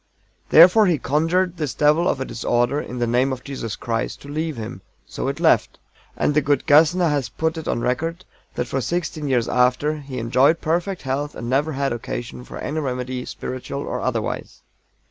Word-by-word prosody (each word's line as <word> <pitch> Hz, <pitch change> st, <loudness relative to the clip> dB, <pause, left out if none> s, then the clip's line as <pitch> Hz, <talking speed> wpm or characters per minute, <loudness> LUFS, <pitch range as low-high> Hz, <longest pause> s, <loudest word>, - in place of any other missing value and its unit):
"Therefore 185 Hz, +6 st, +7 dB
he 170 Hz, -4 st, +3 dB
conjured 165 Hz, +6 st, 0 dB
this 150 Hz, -6 st, -3 dB
devil 155 Hz, +4 st, +3 dB
of -, -, -1 dB
a 130 Hz, -, -2 dB
disorder, 120 Hz, +4 st, 0 dB
in 125 Hz, -, -7 dB
the 120 Hz, -, +1 dB
name 125 Hz, +3 st, +2 dB
of 130 Hz, -1 st, -5 dB
Jesus 130 Hz, -6 st, -5 dB
Christ 115 Hz, -2 st, -3 dB
to -, -, -11 dB
leave 155 Hz, 0 st, -3 dB
him 110 Hz, -4 st, -6 dB, 0.2 s
so -, -, -5 dB
it -, -, -3 dB
left, -, -, +3 dB, 0.4 s
and -, -, +1 dB
the 150 Hz, -, +3 dB
good 140 Hz, -1 st, +1 dB
GASSNER 165 Hz, +4 st, +5 dB
has 145 Hz, -4 st, -1 dB
put 160 Hz, 0 st, -1 dB
it 160 Hz, -1 st, -6 dB
on 120 Hz, -, -1 dB
record 165 Hz, +9 st, -2 dB, 0.3 s
that -, -, -1 dB
for 130 Hz, +2 st, -2 dB
sixteen 155 Hz, 0 st, -2 dB
years 125 Hz, -4 st, +1 dB
after 125 Hz, +5 st, +2 dB
he 140 Hz, -3 st, -8 dB
enjoyed 130 Hz, +7 st, +3 dB
perfect 175 Hz, +4 st, -1 dB
health 140 Hz, +2 st, -2 dB
and 120 Hz, +1 st, -5 dB
never 145 Hz, +4 st, +1 dB
had 140 Hz, -1 st, -1 dB
occasion 120 Hz, +1 st, -6 dB
for -, -, -9 dB
any 155 Hz, -, -3 dB
remedy, 125 Hz, -2 st, -3 dB
spiritual 130 Hz, +2 st, -5 dB
or -, -, -4 dB
otherwise. -, -, -3 dB
140 Hz, 190 wpm, -22 LUFS, 125-160 Hz, 0.4 s, Therefore